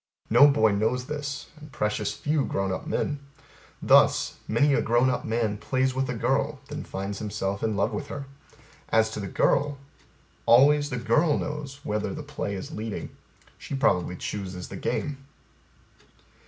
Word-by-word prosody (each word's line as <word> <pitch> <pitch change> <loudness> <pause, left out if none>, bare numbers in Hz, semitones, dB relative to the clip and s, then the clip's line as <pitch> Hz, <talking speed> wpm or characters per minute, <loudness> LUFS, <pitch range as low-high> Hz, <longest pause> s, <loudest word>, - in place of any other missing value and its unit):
No 145 - +8
boy 110 -7 +4
knows 110 +5 0
this 145 0 -4
and 150 -1 -12
precious 105 -3 -1
few 150 -1 0
grown 95 -5 -1
up 95 - -4
men. 145 - -1 0.6
Thus - - +4
Many 140 +6 +3
a - - +3
grown 120 +3 +3
up - - -3
man 110 -2 -1
plays 130 +3 0
with 130 0 -1
a 125 - -2
girl, 135 +5 0
then 150 +1 -5
finds 100 +1 -5
himself 100 -2 -3
in 110 -2 0
love 100 - +1
with 145 - -4
her. 140 -1 -6 0.6
As 110 0 +3
to 105 - -5
the 100 - -4
girl 145 +8 +1 0.7
Always 145 +4 +6
the 125 - -3
girl 145 +7 +2
knows 145 -2 -5
whether 105 0 -2
the 155 - -6
play 145 -8 -4
is 95 - -6
leading: 110 -1 -5 0.4
she - - -5
probably 90 -10 +1
chooses 95 -2 -5
the - - -7
game. 140 -2 -3
125 Hz, 165 wpm, -26 LUFS, 105-145 Hz, 0.7 s, No